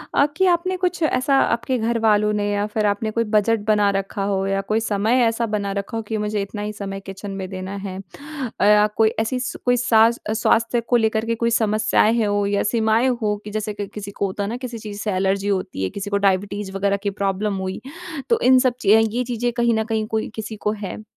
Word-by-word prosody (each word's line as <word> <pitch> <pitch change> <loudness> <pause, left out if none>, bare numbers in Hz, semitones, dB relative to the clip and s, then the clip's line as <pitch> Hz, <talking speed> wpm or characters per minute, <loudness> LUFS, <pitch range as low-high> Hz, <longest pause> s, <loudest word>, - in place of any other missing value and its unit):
अ, 280 - +5
कि 380 - +3
आपने 370 +2 -1
कुछ 360 -1 -1
ऐसा 275 -1 +2
आपके 235 +2 +1
घरवालों 220 -2 +2
ने 205 0 0
या 205 0 0
फिर 215 0 -1
आपने 205 +2 0
कोई 230 +1 0
बजट 215 +1 +3
बना 210 -1 +3
रखा 195 0 -3
हो 195 0 0
या 195 0 0
कोई 220 - +3
समय 225 +3 +1
ऐसा 230 +1 0
बना 205 -2 -2
रखा 200 +3 -4
हो 225 - -3
कि 220 +1 -3
मुझे 210 0 -1
इतना 205 +1 -5
ही 210 0 -4
समय 195 -1 -5
किचन 195 +1 -8
में 185 - -4
देना 190 +1 -6
है। 185 -1 -5
अ, 210 - +1
कोई 220 -1 +5
ऐसी 240 +3 -1 0.3
कोई 245 0 +3
सा 225 -2 +5 0.2
स्वास्थ्य 230 +2 +2
को 240 +2 0
लेकर 220 0 +1
के 230 0 0
कोई 235 +1 0
समस्याएँ 220 +1 +2
हो 205 0 +1
या 200 0 +1
सीमाएँ 225 +2 +2
हो 210 -1 +1
कि 210 - -8
जैसे 215 0 -3
कि 205 -1 -5
किसी 205 0 -8
को 200 - -2
होता 195 +1 -3
है 200 - -3
ना 240 - -3
किसी 250 -2 -6
चीज़ 210 -2 -8
से 210 - -1
एलर्जी 195 +1 0
होती 185 - -2
है, 95 - 0
किसी 200 0 -6
को 200 - +1
डायबिटीज 200 0 0
वग़ैरह 200 0 +1
की 200 - +1
प्रॉब्लम 200 +1 0
हुई 190 0 -4 0.5
तो 465 - +3
इन 255 0 +6
सब 255 -1 +2
चीज़ 220 +2 +5
ये 250 - +1
चीज़ें 240 0 -2
कहीं 235 -1 +3
न 220 - +1
कहीं 220 -1 -1
कोई 220 0 -2
किसी 220 0 -5
को 210 - +3
है? 215 0 -6
215 Hz, 230 wpm, -21 LUFS, 200-230 Hz, 0.5 s, इन